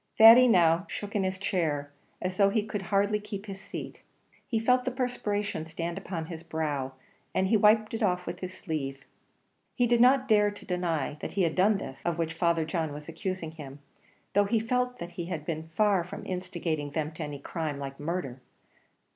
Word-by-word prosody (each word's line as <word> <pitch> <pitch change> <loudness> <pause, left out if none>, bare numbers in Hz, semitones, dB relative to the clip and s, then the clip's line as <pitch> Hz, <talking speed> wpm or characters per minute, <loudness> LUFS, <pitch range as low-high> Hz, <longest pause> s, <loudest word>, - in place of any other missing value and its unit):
Thady 230 +3 +10
now 175 -3 +4
shook 205 0 -5
in 205 - +2
his 185 0 -1
chair, 155 -7 -1 0.3
as 185 0 -2
though 200 -1 +5
he 210 +1 0
could 210 -2 -3
hardly 200 +2 +1
keep 210 -1 -7
his 195 -2 -8
seat; - - -7 0.5
he 230 - 0
felt 250 +3 +3
the 255 - 0
perspiration 210 - -2
stand 165 +1 -4
upon 175 -4 -4
his 160 -1 -7
brow, 150 -5 -2 0.4
and 190 0 +2
he 225 - +4
wiped 215 +1 +4
it 225 - -3
off 180 -4 +1
with - - -5
his 185 -1 -5
sleeve; 145 -7 -5 0.7
he 245 - +3
did 240 0 +3
not 260 +1 +5
dare 210 -3 +5
to 205 - -10
deny 170 -5 -1
that - - -5
he 195 - +2
had 165 -2 +1
done 200 +3 +4
this, 135 -6 -7
of 170 -1 -1
which 165 -1 -1
Father 165 -1 +1
John 160 -2 -2
was 150 0 -9
accusing 170 -1 -4
him, 145 -4 -9 0.6
though 205 +1 +4
he 225 +2 +2
felt 250 +2 0
that 170 0 -7
he 175 0 -5
had 165 -4 -4
been 160 0 -4
far 195 +1 +2
from 180 - -8
instigating 170 -5 -3
them 155 +1 -2
to 155 0 -6
any 145 -1 -5
crime 150 +1 -4
like 135 -1 -6
murder. 145 -5 -3
180 Hz, 200 wpm, -29 LUFS, 160-210 Hz, 0.7 s, Thady